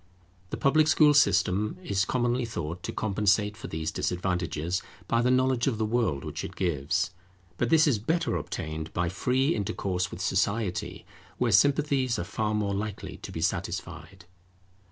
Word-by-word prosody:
The - - -4
public 155 +3 +3
school 150 -1 +5
system 105 -7 +3
is 100 0 0
commonly 120 0 0
thought 90 -7 -4
to - - -4
compensate 105 0 +1
for - - -8
these 80 0 -3
disadvantages, 90 -1 -1 0.3
by 115 - +2
the 125 - +2
knowledge 130 -1 +2
of 125 -5 0
the 110 - 0
world 110 - 0
which - - -5
it - - -7
gives; 85 0 0 0.5
but 120 - +1
this 155 +1 +5
is 135 -9 +2
better 165 +9 0
obtained 80 0 -4
by 85 -1 0
free 130 - +1
intercourse 95 -3 -2
with - - -8
society, 100 +1 -1 0.3
where 125 -2 +1
sympathies 135 +2 +3
are - - -2
far 105 +3 -2
more 100 -2 0
likely 105 +1 -4
to - - -9
be - - -5
satisfied. 95 -2 -4
105 Hz, 160 wpm, -28 LUFS, 90-125 Hz, 0.5 s, school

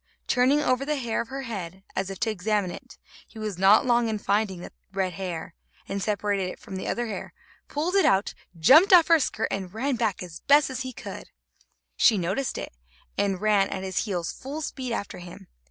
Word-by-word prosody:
Turning 260 +3 +3
over 255 -2 +1
the 300 +2 -1
hair 240 -5 -1
of 230 - -7
her 270 +2 -5
head, 190 -6 -6
as 190 0 -1
if 195 - -7
to 220 - +1
examine 205 -1 0
it, - - -11 0.3
he - - -16
was 210 -4 -4
not 195 +5 +6
long 240 -1 +3
in 215 - -1
finding 205 -2 0
that - - -9 0.2
red 190 -2 -1
hair, 175 -4 -5 0.3
and 200 - -3
separated 200 -2 0
it - - -9
from 190 - -9
the 190 - -4
other 240 - -1
hair, 220 -3 -6 0.3
pulled 315 +5 -2
it 395 -1 +4
out, 195 +1 +2 0.2
jumped 300 - +7
off 345 -2 +7
her 330 -1 +7
skirt - - -1
and 190 0 -4
ran 260 +6 -1
away 260 - 0
back 220 -6 -1
as 170 -3 -8
he - - -38
best 265 -3 +3
could. - - -8 0.7
She 220 - +5
noticed 195 +9 -1
it, - - -6 0.4
and 195 -2 0
ran 210 -2 +3
at 190 - -4
his 190 +2 -1
heels 180 -5 -2
full 290 +4 -6
speed 260 -4 -4
after 205 -5 -4
him. 175 0 -11
215 Hz, 210 wpm, -26 LUFS, 190-255 Hz, 0.7 s, jumped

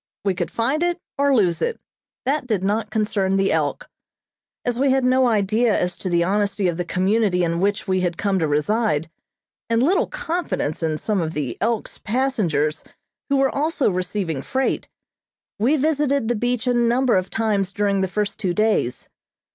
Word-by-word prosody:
We 195 - +2
could 175 -1 -3
find 265 +7 0
it 350 0 0 0.2
or 280 -1 +4
lose 180 -7 +2
it 470 - -1 0.5
that 275 0 0
did 210 -6 0
not 210 +2 0
concern 205 -3 0
the 195 0 +2
"Elk." - - -1 0.8
As 245 0 -1
we 275 +1 +3
had 265 0 +2
no 255 0 +4
idea 220 +1 +2
as 180 0 -1
to 185 - -4
the 170 -1 +2
honesty 200 +1 0
of 170 -2 -1
the 175 - -2
community 185 +1 +1
in 170 0 0
which 200 +2 0
we 185 0 +1
had 175 -2 -1
come 200 -2 0
to 160 - +1
reside, 160 +2 0 0.6
and 230 +1 +2
little 355 +8 +2
confidence 340 - -3
in 160 -2 0
some 205 +2 -1
of 160 -1 -3
the 140 -6 -2
"Elk's" 225 0 -1
passengers 210 - 0 0.5
who 280 - +3
were 270 -1 +2
also 300 -4 +1
receiving 180 -4 -2
freight, 265 - -1 0.7
we 260 +9 +3
visited 280 -4 +1
the 240 - +1
beach 245 +1 -1
a 250 - +2
number 240 +1 +2
of 185 0 0
times 205 -4 0
during 200 -2 0
the 190 - +1
first 205 +2 -2
two 185 -4 -1
days. 215 - 0
210 Hz, 180 wpm, -22 LUFS, 185-255 Hz, 0.8 s, or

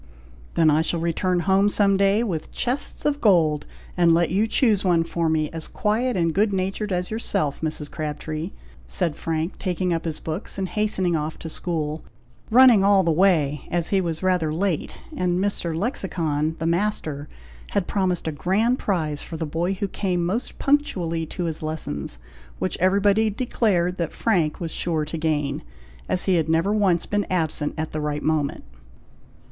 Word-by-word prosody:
"Then 160 -2 +5
I 155 +2 +3
shall 165 +1 -1
return 175 +2 0
home 195 +2 +3
some 200 -1 +3
day 200 +3 +3
with 170 -9 -3
chests 255 +4 -2
of 290 -1 +1
gold, 160 -8 +3 0.3
and 170 -2 +5
let 170 -1 +2
you 205 +5 +2
choose 220 -4 +2
one 175 -3 +3
for 165 0 -1
me, 155 -1 0
as 165 -1 -6
quiet 225 +2 0
and 165 -2 +1
good 205 +3 +2
natured 195 +2 -2
as 180 +1 -1
yourself, 195 -9 -1
Mrs. 155 -2 -4
Crabtree," 155 +2 -4 0.4
said 170 -5 -1
Frank, 160 +2 -3
taking 180 -1 -1
up 165 0 -2
his 160 -2 -3
books 160 +6 -4
and 190 -1 -2
hastening 200 -5 +1
off 155 0 -3
to 165 - -7
school, 155 -2 -3 0.5
running 240 -3 +7
all 200 -1 +5
the 165 - +2
way, 155 -5 +3
as 170 -1 0
he 195 -1 +2
was 165 -1 -3
rather 180 -4 +2
late, 175 0 -1 0.2
and 180 -1 0
Mr. 180 -4 -1
Lexicon, 160 - -1
the 160 - -3
master, 165 -5 -1 0.4
had 200 -3 +1
promised 185 -4 -1
a - - 0
grand 210 - +1
prize 155 -7 -1
for 165 - -7
the 160 - -2
boy 170 +5 -1
who 200 +1 -2
came 180 -3 -1
most 215 +8 -2
punctually 180 - 0
to 180 - -4
his 165 -2 -3
lessons, 110 - -4 0.4
which 185 - -2
everybody 200 +4 +3
declared 195 -6 0
that 170 -2 -2
Frank 175 -9 +1
was 165 -2 -4
sure 160 -3 -1
to 155 +2 -5
gain, 150 -3 -1 0.5
as 180 - +2
he 185 -2 +3
had 160 -1 0
never 165 +6 +2
once 195 -5 +2
been 205 -1 -1
absent 160 -4 -1
at 155 0 -3
the 155 - -3
right 150 0 -2
moment. 155 -3 0
175 Hz, 175 wpm, -23 LUFS, 160-195 Hz, 0.5 s, running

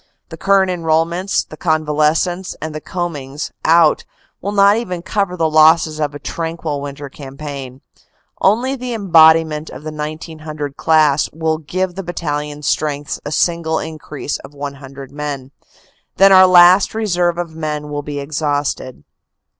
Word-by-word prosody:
The - - -8
current 195 -1 +2
enrolments, 170 +2 0
the - - -10
convalescents, 155 +3 0
and 155 0 -5
the 155 - -6
combings 150 -6 -5
out 165 -1 +4 0.4
will 200 - -3
not 200 0 +5
even 180 -7 -4
cover 195 -3 -1
the 165 -2 +2
losses 155 0 +4
of 145 -1 -2
a - - -4
tranquil 160 -2 -4
winter 140 0 -7
cam 135 0 -11
paign. 140 -3 -7 0.6
Only 240 +7 +2
the 250 -2 -5
embodiment 160 -5 +4
of 140 - -10
the 155 - -5
1900 155 -1 -6
class 155 -3 +3
will 160 0 -1
give 180 +4 -3
the 195 - -5
battalion 150 -4 -4
strengths 145 0 -2
a 145 - -5
single 165 -1 0
increase 150 -2 -5
of 140 +2 -14
100 140 -1 -8
men. 145 -3 -5 0.7
Then 195 0 +6
our 185 -1 +8
last 180 +3 +6
reserve 175 -6 0
of 170 -2 -5
men 150 -2 -4
will 145 0 -3
be 145 0 -5
exhausted. 145 - -3
155 Hz, 145 wpm, -17 LUFS, 145-175 Hz, 0.7 s, our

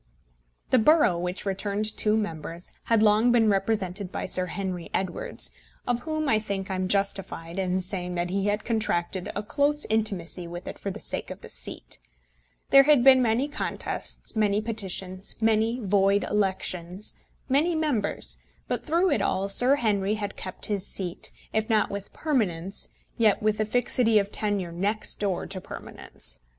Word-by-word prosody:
The 255 - +6
borough, 225 - +4
which 180 +3 -3
returned 205 +2 -1
two 215 0 +2
members, 170 -3 -4
had 225 -2 +3
long 215 +3 +5
been 230 -2 +4
represented 195 -2 -1
by - - -3
Sir 185 0 +3
Henry 185 -1 -4
Edwards, - - -1 0.3
of 245 -1 0
whom, 310 +2 -2
I 220 -5 +3
think, 195 -3 -4
I - - 0
am 185 0 -1
justified 195 -3 -2
in 185 0 0
saying 180 -1 0
that 175 0 -1
he 195 +1 0
had 205 +1 -1
contracted 190 -5 -1
a 205 - -2
close 290 +6 0
intimacy 190 -5 -1
with 175 +1 -8
it - - -7
for 200 - -4
the 190 - -6
sake - - -2
of - - -8
the - - -11
seat. - - -5 0.7
There 275 - +10
had 280 -3 +5
been 260 -1 +8
many 240 +3 +2
contests, 295 -4 -2
many 210 -1 +2
petitions, 195 -4 -2
many 225 +2 +2
void 200 -1 +2
elections, 190 -2 -2 0.3
many 300 +6 +2
members, 290 -10 +1 0.3
but, - - -2
through 340 +4 +2
it 210 - +2
all, 195 0 0
Sir 250 +7 +6
Henry 210 -5 +1
had 205 -2 -4
kept 185 0 -5
his 205 -3 -1
seat, 180 -3 -1 0.2
if 220 +1 0
not 220 -2 +2
with 200 0 -6
permanence, 195 - -1 0.3
yet 215 -3 +3
with 215 0 +1
a 215 - +2
fixity 230 0 +2
of 200 0 +1
tenure 200 -5 -1
next 200 +6 0
door 195 -4 -1
to 190 -1 -6
permanence. - - -5
205 Hz, 165 wpm, -26 LUFS, 185-225 Hz, 0.7 s, There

